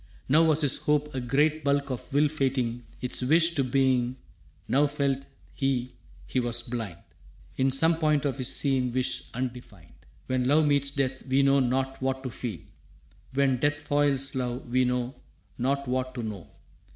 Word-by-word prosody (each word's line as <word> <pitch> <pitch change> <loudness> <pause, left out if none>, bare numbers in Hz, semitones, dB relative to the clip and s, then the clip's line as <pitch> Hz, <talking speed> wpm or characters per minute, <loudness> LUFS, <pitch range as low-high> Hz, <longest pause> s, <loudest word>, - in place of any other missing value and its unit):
Now 150 +5 +5
was 160 0 +4
his 145 -3 +4
hope 150 0 +1
a 130 - -2
great 150 +5 +1
bulk 140 0 +1
of 130 +3 -6
will 145 +2 +3
fating 130 -5 -1 0.2
Its 125 +1 -3
wish 165 +6 +4
to 140 - +1
being, 130 -1 +1 0.5
now 145 +2 +3
felt 140 -1 -1 0.3
he 130 -2 -1 0.3
he 130 - -1
was 120 -1 -2
blind 115 -7 -5 0.6
In 130 +1 +3
some 160 +5 +3
point 150 -2 +2
of 140 -1 -1
his 130 - +2
seen 130 -3 +1
wish 130 +1 -1
undefined. 120 -8 -6 0.3
When 130 -1 0
love 150 +3 +4
meets 140 -1 +2
death 135 -2 -2
we 135 +1 +3
know 140 0 +4
not 135 +1 -1
what 130 0 -1
to 130 - -4
feel. 110 - -5 0.7
When 135 -2 +3
death 145 +3 0
foils 145 -2 0
love 125 -1 -3
we 130 +1 +3
know 125 0 -1 0.5
not 140 +2 0
what 130 0 -2
to 120 - -4
know. 105 -6 -6
135 Hz, 170 wpm, -27 LUFS, 125-140 Hz, 0.7 s, Now